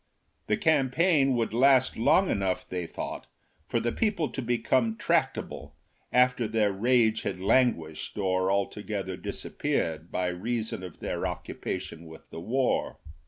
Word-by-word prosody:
The 105 Hz, -, +2 dB
campaign 145 Hz, -1 st, +3 dB
would 115 Hz, -2 st, -1 dB
last 130 Hz, +1 st, +4 dB
long 185 Hz, +11 st, +3 dB
enough, 95 Hz, -2 st, -1 dB
they 90 Hz, -2 st, -4 dB
thought, -, -, -6 dB, 0.4 s
for 115 Hz, -, 0 dB
the 120 Hz, +1 st, -1 dB
people 200 Hz, -, 0 dB
to -, -, -4 dB
become 120 Hz, -1 st, +1 dB
tractable, -, -, -1 dB, 0.4 s
after 125 Hz, -2 st, +3 dB
their 105 Hz, -2 st, +2 dB
rage 110 Hz, +2 st, +2 dB
had -, -, -3 dB
languished 95 Hz, -8 st, +1 dB
or 95 Hz, -2 st, +1 dB
altogether 100 Hz, -1 st, -2 dB
disappeared 80 Hz, -2 st, -3 dB
by 90 Hz, -, -1 dB
reason 110 Hz, +3 st, -3 dB
of 90 Hz, -3 st, -10 dB
their -, -, -2 dB
occupation 90 Hz, -3 st, -5 dB
with 80 Hz, 0 st, -13 dB
the -, -, -7 dB
war. 125 Hz, +7 st, 0 dB
110 Hz, 135 wpm, -28 LUFS, 95-125 Hz, 0.4 s, last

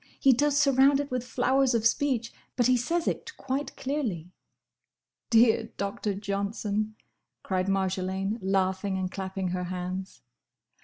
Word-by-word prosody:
He 270 Hz, -, +6 dB
does 290 Hz, +3 st, +2 dB
surround 275 Hz, -1 st, +5 dB
it 285 Hz, -1 st, -3 dB
with 250 Hz, -1 st, -1 dB
flowers 260 Hz, +1 st, +2 dB
of 225 Hz, -1 st, 0 dB
speech, 235 Hz, -1 st, +1 dB, 0.2 s
but 245 Hz, -, +2 dB
he 255 Hz, -, +5 dB
says 330 Hz, +8 st, 0 dB
it 460 Hz, -, -3 dB
quite 275 Hz, +2 st, -3 dB
clearly." 225 Hz, -, -3 dB, 1.0 s
"Dear 225 Hz, -1 st, +5 dB
Doctor 200 Hz, 0 st, -2 dB
Johnson!" 205 Hz, +1 st, -2 dB, 0.5 s
cried 185 Hz, -1 st, -1 dB
Marjolaine, 190 Hz, +2 st, -1 dB
laughing, 190 Hz, 0 st, 0 dB
and 185 Hz, -1 st, -2 dB
clapping 190 Hz, -1 st, -3 dB
her 180 Hz, 0 st, -2 dB
hands. 185 Hz, +1 st, -5 dB
215 Hz, 135 wpm, -28 LUFS, 190-260 Hz, 1.0 s, He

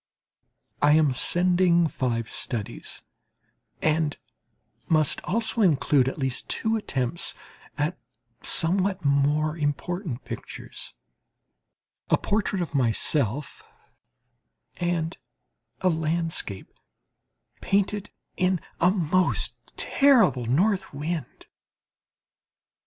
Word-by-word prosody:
I 145 Hz, 0 st, +5 dB
am 150 Hz, -3 st, +4 dB
sending 175 Hz, +4 st, +3 dB
five 120 Hz, -6 st, -2 dB
studies, 110 Hz, -3 st, -4 dB, 0.8 s
and 155 Hz, -1 st, +1 dB, 0.7 s
must 155 Hz, -3 st, +3 dB
also 225 Hz, +3 st, 0 dB
include 145 Hz, -7 st, +3 dB
at -, -, -8 dB
least 135 Hz, -4 st, -3 dB
two 225 Hz, 0 st, 0 dB
attempts 140 Hz, -, -2 dB, 0.4 s
at 155 Hz, +4 st, -1 dB, 0.4 s
somewhat 185 Hz, +1 st, +3 dB
more 145 Hz, +2 st, +2 dB
important 155 Hz, -, -3 dB
pictures -, -, -8 dB, 1.1 s
a -, -, +4 dB
portrait 205 Hz, -3 st, -1 dB
of 165 Hz, -, -8 dB
myself 135 Hz, +1 st, 0 dB, 1.2 s
and 175 Hz, -1 st, -1 dB, 0.7 s
a 185 Hz, -, +3 dB
landscape 160 Hz, -, -1 dB, 0.9 s
painted 200 Hz, +1 st, 0 dB, 0.3 s
in 185 Hz, 0 st, +2 dB, 0.2 s
a 175 Hz, -, +5 dB
most 185 Hz, -1 st, +1 dB, 0.2 s
terrible 235 Hz, -, +3 dB
north 190 Hz, -, +1 dB
wind. 150 Hz, -1 st, -5 dB
160 Hz, 85 wpm, -25 LUFS, 140-185 Hz, 1.2 s, I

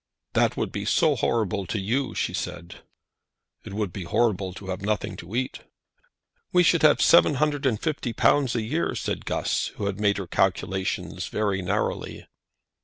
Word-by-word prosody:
"That -, -, +2 dB
would -, -, -1 dB
be -, -, -4 dB
so -, -, +3 dB
horrible 105 Hz, -4 st, 0 dB
to 100 Hz, -, -2 dB
you!" 120 Hz, +7 st, -1 dB
she -, -, -1 dB
said. 85 Hz, +1 st, -6 dB, 0.8 s
"It 100 Hz, -, -8 dB
would 105 Hz, -4 st, -2 dB
be 95 Hz, -, -5 dB
horrible 100 Hz, -1 st, +1 dB
to 95 Hz, -1 st, -9 dB
have 95 Hz, +1 st, -3 dB
nothing 105 Hz, 0 st, -1 dB
to 90 Hz, +6 st, -8 dB
eat." 130 Hz, +1 st, -2 dB, 0.9 s
"We 180 Hz, -, +5 dB
should 170 Hz, -1 st, +4 dB
have 150 Hz, -1 st, +5 dB
seven 165 Hz, -3 st, +6 dB
hundred 145 Hz, -1 st, +1 dB
and 110 Hz, -5 st, 0 dB
fifty 145 Hz, -6 st, -2 dB
pounds 135 Hz, +2 st, +2 dB
a 115 Hz, -, 0 dB
year," 150 Hz, +10 st, -1 dB
said -, -, -3 dB
Guss, -, -, 0 dB
who 100 Hz, -, -4 dB
had 100 Hz, 0 st, -2 dB
made 100 Hz, -1 st, +2 dB
her 100 Hz, -, -4 dB
calculations 95 Hz, +1 st, -1 dB
very 100 Hz, -3 st, -1 dB
narrowly. 90 Hz, -, -2 dB
105 Hz, 175 wpm, -25 LUFS, 95-130 Hz, 0.9 s, seven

